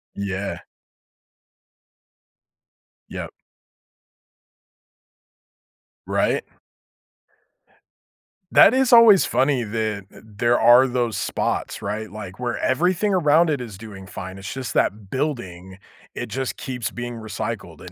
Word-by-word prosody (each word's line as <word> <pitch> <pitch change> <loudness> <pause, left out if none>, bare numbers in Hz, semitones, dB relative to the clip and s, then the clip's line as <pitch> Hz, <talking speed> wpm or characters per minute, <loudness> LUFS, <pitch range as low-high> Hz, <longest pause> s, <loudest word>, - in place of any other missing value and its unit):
Yeah. 100 0 -4 2.5
Yep. - - -6 2.7
Right? - - 0 2.1
That 210 - +7
is 260 -1 +3
always 230 -5 +8
funny 135 -2 +1
that 110 -2 -3
th - - -15
there 110 +3 0
are 125 +2 +7
those 120 -3 -1
spots, - - -2
right? 105 +2 -4
Like, 100 -3 -9
where 120 -1 -2
everything 180 +8 +1
around 165 -1 +4
it 145 -3 0
is 110 -6 -8
doing 100 -2 -10
fine, 95 -1 -8
it's 95 0 -7
just 130 -2 -5
that 100 -1 0
building, 95 - -4 0.3
it - - -5
just 130 -1 -4
keeps 125 -3 -4
being 120 0 -6
recycled, 110 -6 -6
It 90 - -10
115 Hz, 105 wpm, -22 LUFS, 100-135 Hz, 2.7 s, always